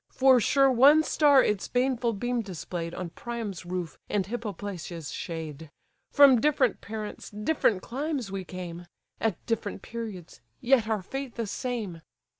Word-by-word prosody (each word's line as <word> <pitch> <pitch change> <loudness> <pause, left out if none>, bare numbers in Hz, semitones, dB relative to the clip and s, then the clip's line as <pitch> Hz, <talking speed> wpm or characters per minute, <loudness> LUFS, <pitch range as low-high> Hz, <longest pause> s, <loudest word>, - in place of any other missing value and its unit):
For 260 -1 +5
sure 270 +3 +4
one 280 +6 +7
star 290 -4 +5
its 210 -2 0
baneful 245 -2 +1
beam 245 +3 -1
display'd 175 -3 -5
On 175 -2 -5
Priam's 220 -7 -6
roof, 180 -2 -4
and 200 -3 0
Hippoplacia's 195 -7 -5
shade. 160 -2 -6 0.4
From 275 -5 +7
different 275 -5 +2
parents, 215 -1 -6
different 210 -2 0
climes 270 -4 -3
we 195 -1 -4
came. 175 -1 -7 0.3
At 220 -6 -1
different 215 -4 -3
periods, 215 -7 -7 0.2
yet 245 -3 +3
our 215 -4 -1
fate 270 +4 -6
the 230 - -2
same! 210 -6 -4
220 Hz, 140 wpm, -28 LUFS, 185-255 Hz, 0.4 s, one